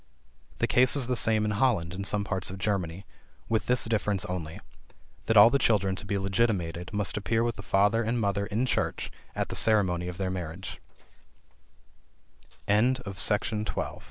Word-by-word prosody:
The - - +1
case 130 +3 +5
is 140 -3 +1
the 125 +1 -1
same 110 -2 +2
in 105 - 0
Holland 100 -7 +1
and 100 +1 -4
some 105 -1 0
parts 95 -2 -2
of 95 - -6
Germany; 95 -3 -2 0.4
with 110 -1 -1
this 125 0 +2
difference 105 -3 -1
only, 85 -5 -5 0.7
that 115 - +3
all 105 +3 +9
the 140 - +2
children 100 -6 +2
to 100 - -9
be 100 - -1
legitimated 95 -4 -1
must 105 -4 0
appear 110 +3 0
with 120 -1 -1
the - - -8
father 105 +4 +2
and 120 +2 -1
mother 100 -1 -1
in 110 +5 -1
church 130 - -2 0.2
at - - -2
the - - -5
ceremony 95 -5 +2
of 90 -1 -6
their 95 -1 -2
marriage. 90 0 -6 1.8
FEMALE 110 +6 +3 0.2
FRIENDSHIP. 105 +2 -1
105 Hz, 170 wpm, -27 LUFS, 95-115 Hz, 1.8 s, all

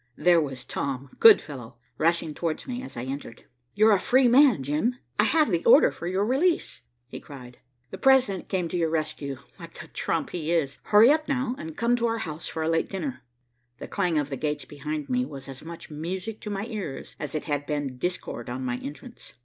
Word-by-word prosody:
There 175 -2 +5
was 135 -4 -5
Tom, 135 -1 -4
good 450 -2 +9
fellow, 125 -5 -10 0.2
rushing 165 -1 +1
towards 165 0 -3
me 250 -1 -4
as 260 - -9
I 120 - -3
entered. 130 -2 -7 0.3
"You're 215 +2 +5
a 200 - +4
free 255 +4 +4
man, 245 - +5
Jim; 150 - 0 0.2
I 210 - +5
have 305 -1 +3
the 170 -1 0
order - - +7
for 170 - -7
your 190 +3 0
release," 305 +9 +1 0.3
he - - -6
cried. 125 -4 -12 0.3
"The - - -7
President 260 -9 +3
came 185 -3 0
to 180 - -2
your 165 -2 +1
rescue, 155 -3 -3 0.2
like - - -11
the - - -9
trump - - -2
he 165 -2 -3
is. 150 -5 0
Hurry 220 +5 +7
up 310 0 +1
now, 260 -2 0
and 160 -1 -7
come 235 +1 +2
to 235 0 +1
our 230 0 -1
house 160 -7 -5
for 160 - -3
a - - -1
late 165 0 +1
dinner." 145 -9 -4 0.6
The - - -8
clang 180 -5 0
of 145 -1 -1
the 135 - -3
gates 150 +1 -2
behind 150 0 -5
me 125 0 +1
was 135 0 -8
as 135 -1 -8
much 165 0 -9
music 185 +8 -5
to 210 - -6
my 200 0 -3
ears 210 - -6
as 150 -1 -4
it 155 - -3
had 145 -2 -2
been 145 -4 -3
discord 175 -9 -4
on 130 +1 -4
my 125 -1 -1
entrance. 190 - -10
165 Hz, 215 wpm, -26 LUFS, 140-215 Hz, 0.6 s, good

